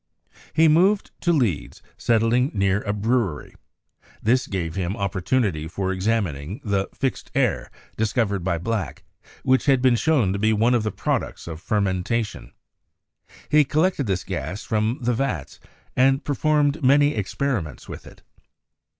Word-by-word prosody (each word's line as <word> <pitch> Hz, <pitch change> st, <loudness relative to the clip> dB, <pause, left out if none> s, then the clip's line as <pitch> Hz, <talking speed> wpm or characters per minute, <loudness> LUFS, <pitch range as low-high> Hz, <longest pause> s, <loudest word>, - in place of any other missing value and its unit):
He 160 Hz, +1 st, +5 dB
moved 185 Hz, +6 st, +3 dB
to 175 Hz, -, +2 dB
Leeds, 120 Hz, -, -1 dB
settling 115 Hz, +3 st, +2 dB
near 100 Hz, 0 st, +1 dB
a 100 Hz, -, -2 dB
brewery. 105 Hz, -6 st, -1 dB, 0.7 s
This 125 Hz, +4 st, +1 dB
gave 85 Hz, -5 st, -3 dB
him 95 Hz, 0 st, -3 dB
opportunity 95 Hz, -3 st, -1 dB
for 95 Hz, +3 st, -2 dB
examining 95 Hz, -, -2 dB
the 100 Hz, -2 st, -1 dB
"fixed 135 Hz, -3 st, -3 dB
air" -, -, +1 dB, 0.3 s
discovered 105 Hz, -3 st, 0 dB
by 85 Hz, -2 st, 0 dB
Black, 95 Hz, -, -3 dB, 0.2 s
and -, -, -25 dB
which 130 Hz, +1 st, +2 dB
had 135 Hz, -2 st, +5 dB
been 125 Hz, -1 st, +4 dB
shown 120 Hz, -5 st, +2 dB
to 100 Hz, -, -3 dB
be 110 Hz, +2 st, +3 dB
one 115 Hz, +3 st, +3 dB
of 120 Hz, -, +3 dB
the 110 Hz, 0 st, -2 dB
prod -, -, 0 dB
ucts -, -, -10 dB
of 80 Hz, -1 st, -7 dB
fermentation. 105 Hz, +2 st, -1 dB, 1.0 s
He 150 Hz, 0 st, +5 dB
collected 155 Hz, -, 0 dB
this 95 Hz, -2 st, -1 dB
gas 90 Hz, +2 st, -5 dB
from 110 Hz, +3 st, 0 dB
the 120 Hz, +1 st, +1 dB
vats, 115 Hz, -, -3 dB, 0.4 s
and 135 Hz, +2 st, +3 dB
performed 150 Hz, +1 st, +1 dB
many 145 Hz, +3 st, +5 dB
experiments 105 Hz, -, -3 dB
with -, -, -9 dB
it. -, -, -15 dB
110 Hz, 150 wpm, -23 LUFS, 95-130 Hz, 1.0 s, He